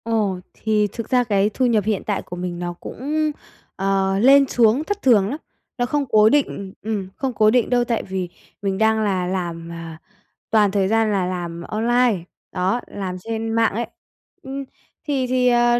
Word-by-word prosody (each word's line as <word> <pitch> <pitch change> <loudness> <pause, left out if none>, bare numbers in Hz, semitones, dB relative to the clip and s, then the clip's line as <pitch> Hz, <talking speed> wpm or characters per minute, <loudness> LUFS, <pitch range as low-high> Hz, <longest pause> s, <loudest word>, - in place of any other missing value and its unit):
Ồ, 215 -5 0
thì 215 -1 +1
thực 230 - -6
ra 250 -1 +3
cái 205 -3 +2
thu 260 - +1
nhập 225 -4 +3
hiện 210 -1 -1
tại 205 -2 -1
của 180 - -8
mình 175 -1 -4
nó 175 0 -3
cũng, 300 - -2 0.4
ờ, 195 0 +1
lên 275 +4 +6
xuống 240 +3 +3
thất 410 +4 -3
thường 210 -6 +4
lắm. 285 - -3 0.4
Nó 245 - +1
không 285 +3 0
cố 215 -1 +6
định 210 -9 0
ừm, 210 -3 -3
không 265 -2 -2
cố 215 -2 +4
định 245 -1 +2
đâu, 245 -1 +3
tại 235 -1 -1
vì 190 -2 -4 0.3
mình 195 -1 -1
đang 220 +1 +3
là 185 -3 0
làm, 170 -2 -3
à, 165 -1 -8 0.5
toàn 210 -3 +4
thời 195 -1 +1
gian 225 +1 +2
là 195 -3 +1
làm 175 -2 -4
online, 235 +1 +1 0.3
đó, 190 +6 0
làm 185 -2 -5
trên 225 +3 -3
mạng 225 -2 +2
ấy. 235 +3 -2 0.6
Ừm. 270 +1 -5 0.4
Thì 270 -3 0
thì, 250 0 +2
ờ, 240 0 +4
215 Hz, 190 wpm, -21 LUFS, 190-245 Hz, 0.6 s, lên